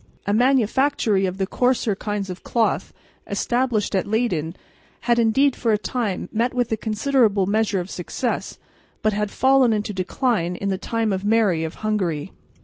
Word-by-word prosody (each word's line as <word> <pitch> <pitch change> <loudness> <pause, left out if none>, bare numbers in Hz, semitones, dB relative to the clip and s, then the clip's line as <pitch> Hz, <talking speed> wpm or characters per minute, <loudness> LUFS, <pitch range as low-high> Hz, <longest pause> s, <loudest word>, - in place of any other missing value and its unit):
A 205 - 0
manufactory 240 -4 +2
of 185 +1 -4
the 195 - 0
coarser 245 0 +1
kinds 205 -1 -3
of 180 - -9
cloth, 230 -2 0 0.4
established 240 +1 0
at 190 - 0
Leyden, 190 -7 -1 0.5
had 235 0 +2
indeed 260 +4 +3
for 230 - 0
a - - +3
time 210 -2 -3
met 235 +3 0
with 245 -2 0
a - - +3
considerable 220 -2 +1
measure 210 0 +1
of 180 +2 -6
success, 230 +7 -3 0.5
but 215 - +2
had 210 0 -1
fallen 265 0 +3
into 210 0 -2
decline 185 -1 -1
in 200 +3 -3
the 190 -1 -1
time 225 0 -1
of 190 0 -3
Mary 205 -6 +2
of 160 - -5
Hungary. 185 -7 -1
215 Hz, 165 wpm, -22 LUFS, 195-240 Hz, 0.5 s, indeed